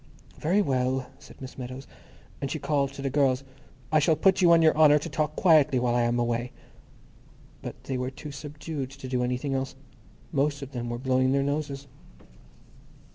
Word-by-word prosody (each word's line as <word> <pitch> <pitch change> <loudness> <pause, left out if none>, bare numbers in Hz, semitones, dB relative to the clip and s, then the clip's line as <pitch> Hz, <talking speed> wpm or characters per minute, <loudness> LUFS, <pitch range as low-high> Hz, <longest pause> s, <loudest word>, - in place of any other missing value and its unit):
"Very 190 +7 +2
well," 130 -2 -1
said - - -15
Miss 130 0 -9
Meadows. 130 +2 -7 0.6
And 140 - -2
she 155 - -2
called 140 -2 0
to 140 - -8
the 135 - -1
girls, 135 -2 +2 0.5
"I 155 - +5
shall 155 +2 +3
put 190 +5 +3
you 175 -2 +6
on 165 -1 +6
your 160 - +5
honour 150 -1 +6
to 150 - -4
talk 155 -1 -1
quietly 155 -7 +4
while 125 -1 +1
I 120 - +2
am 120 0 +1
away." 120 0 -1 1.1
But - - -8
they 130 -2 -3
were 125 0 -2
too 145 +3 -9
subdued 145 0 -6
to 135 -1 -9
do 125 -1 0
anything 125 +3 -2
else. 135 0 -2 0.6
Most 145 -1 0
of 135 - -9
them 120 -2 -4
were 120 - -3
blowing 130 +1 +1
their 140 0 +2
noses. 140 -1 -3
135 Hz, 185 wpm, -27 LUFS, 130-150 Hz, 1.1 s, you